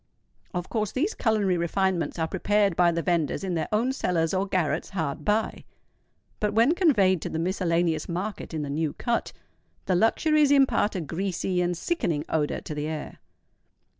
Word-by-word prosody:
Of 180 -2 -4
course 215 -3 -2
these 330 +12 0
culinary 210 -5 +1
refinements 175 +1 0
are 160 -1 0
prepared 200 +1 +1
by 175 0 +4
the 170 0 -2
venders 170 -1 0
in 190 -2 -2
their 160 -2 -1
own 235 +5 +1
cellars 170 -10 0
or 190 +1 0
garrets 170 -5 -1
hard 160 -6 -3
by; 215 +4 0 0.8
but 210 0 -1
when 235 +8 +5
conveyed 205 - +3
to - - -4
the - - -3
miscellaneous 170 -2 0
market 190 +5 -4
in 155 -2 -3
the 145 - -5
New 155 0 -1
Cut, 235 -1 -2 0.5
the 190 - +1
luxuries 295 - +3
impart 270 -7 +3
a 185 - -1
greasy 180 +2 -2
and 175 -1 0
sickening 165 - -1
odour 150 -2 0
to - - -6
the 150 0 -3
air. 155 -1 -6
185 Hz, 170 wpm, -26 LUFS, 165-210 Hz, 0.8 s, when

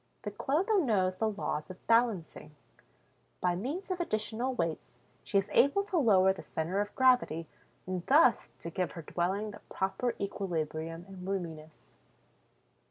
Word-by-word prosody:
The 210 - -3
Clotho 325 - +1
knows 190 - +1
the 220 0 +1
laws 200 -7 -3
of 185 - -11
balancing; 210 -10 +1 0.8
by 180 -1 +1
means 295 - -4
of 365 - -2
additional 230 -3 -1
weights, 165 -7 -3 0.3
she 200 - 0
is 195 0 +2
able 285 +10 +4
to 390 -3 -2
lower 190 -7 +5
the - - -9
center 170 +5 -2
of 205 0 -5
gravity 250 -11 +3 0.4
and 185 -1 -3
thus 265 -5 +5
to 170 - -7
give 180 +1 -2
her 165 - -7
dwelling 190 +7 -1
the 205 - -11
proper 195 +6 -1
equilibrium 165 -4 -3
and 190 -1 -9
roominess. 165 -5 -5
195 Hz, 150 wpm, -31 LUFS, 175-240 Hz, 0.8 s, lower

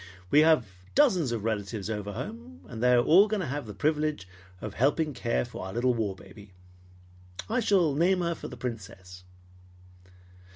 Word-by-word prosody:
We 150 - +6
have 155 -5 +5 0.3
dozens 185 - +3
of 115 -3 -3
relatives 105 -2 -3
over 105 -2 -4
home, 110 -6 -8
and 115 -2 -8
they 125 0 +4
are 120 0 +4
all 190 - +6
going 215 -2 -1
to - - -2
have 140 -2 -4
the 105 - -8
privilege 150 -5 -1 0.3
of 105 +1 -6
helping 145 +5 +1
to 125 - -13
care 115 +1 0
for 120 - -8
our 95 - -7
little 125 +2 +1
war 110 -5 -2
baby. 100 -1 -15 0.9
I 230 +3 0
shall 190 - +2
name 180 +5 +2
her 170 -1 0
for - - -8
the 125 - -10
Princess." 95 -7 -8
125 Hz, 180 wpm, -28 LUFS, 105-155 Hz, 0.9 s, We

